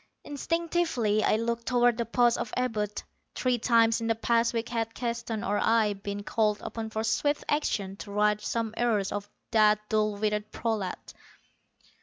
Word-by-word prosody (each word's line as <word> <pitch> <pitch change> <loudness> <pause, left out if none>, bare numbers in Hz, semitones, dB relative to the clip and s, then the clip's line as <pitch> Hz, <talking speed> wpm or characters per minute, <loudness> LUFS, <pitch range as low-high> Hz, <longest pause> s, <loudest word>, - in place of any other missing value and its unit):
Instinctively 315 -8 0
I - - +3
looked 230 +1 -2
toward 245 -1 +3
the 235 -2 -2
post 240 0 +3
of 215 - -4
Abud. 215 -5 -2 0.3
Three 250 -2 +1
times 230 0 +3
in 225 - -2
the 225 - +2
past 230 +1 +2
week 230 0 -3
had 225 -1 -2
Keston 235 -2 -3
or 205 -2 0
I 225 -2 +3
been 200 +1 -6
called 210 -1 +1
upon 225 -1 -5
for 220 0 -3
swift 290 +6 0
action 205 -10 -1
to 200 - -9
right 210 +1 +2
some 230 -2 -2
error 230 -4 +2
of 205 0 -4 0.2
that 215 -2 +5
dull 215 -1 +1
witted 210 0 -1
prolat. 215 -5 -3
225 Hz, 165 wpm, -28 LUFS, 210-235 Hz, 0.3 s, that